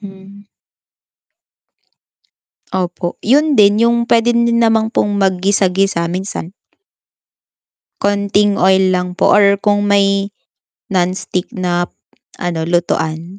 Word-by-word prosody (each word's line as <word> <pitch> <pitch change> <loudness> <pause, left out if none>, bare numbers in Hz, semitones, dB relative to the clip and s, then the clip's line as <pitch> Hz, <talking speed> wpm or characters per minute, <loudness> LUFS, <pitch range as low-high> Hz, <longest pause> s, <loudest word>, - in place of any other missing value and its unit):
Hmm. 195 0 -13 2.3
Opo, 180 -1 -3
yun 290 +6 +2
din 205 -1 +4
yung 235 0 0
puwede 235 +1 +3
din 235 0 +1
naman 225 -1 +2
pong 205 -3 -1
maggisa-gisa 190 -1 0
minsan. 185 -2 -5 1.5
Konting 200 0 +1
oil 190 0 +3
lang 180 0 -3
po - - +2
or 200 -1 +4
kung 205 0 0
may 200 0 +2 0.6
non-stick 185 -1 -2
na 175 -1 -2 0.6
ano, 165 -2 -3
lutuan 170 +1 -2
195 Hz, 100 wpm, -15 LUFS, 180-205 Hz, 2.3 s, din